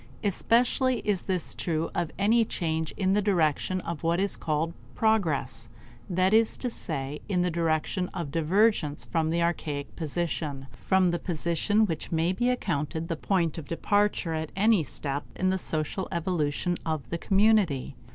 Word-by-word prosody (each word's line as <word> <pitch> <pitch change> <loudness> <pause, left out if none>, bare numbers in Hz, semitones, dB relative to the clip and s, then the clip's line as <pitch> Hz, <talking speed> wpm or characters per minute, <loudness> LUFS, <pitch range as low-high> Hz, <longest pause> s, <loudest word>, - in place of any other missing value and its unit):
Especially 245 +5 +2
is 200 -3 +1
this 185 -3 -2
true 165 -1 -2
of 175 -2 -1
any 225 +4 +4
change 160 -6 -2
in 190 -1 +1
the 210 - +3
direction 185 -1 +1
of 170 -2 -5
what 170 +1 +1
is 200 +1 +1
called 160 +1 -1 0.2
progress; 210 -10 0 0.4
that 185 +2 +2
is 225 0 +4
to 250 - -3
say, 140 -6 -3
in 180 -3 +2
the 180 - 0
direction 165 +3 0
of 165 -5 -5
divergence 165 -1 +2
from 160 -2 0
the 170 +1 +1
archaic 150 -4 -2
position 155 -3 -3
from 190 -2 +2
the 175 - -1
position 175 +5 +1
which 165 -6 -4
may 165 +2 +1
be 240 +6 +1
accounted 160 - -2
the 165 - 0
point 170 -2 0
of 150 - -9
departure 205 0 +1
at 160 -1 -3
any 205 -2 +4
step 140 -1 -3
in 185 0 +1
the 190 - 0
social 160 +3 -2
evolution 170 -1 -1
of 155 -3 -3
the 170 - -2
community. 195 - +2
170 Hz, 160 wpm, -27 LUFS, 160-195 Hz, 0.4 s, any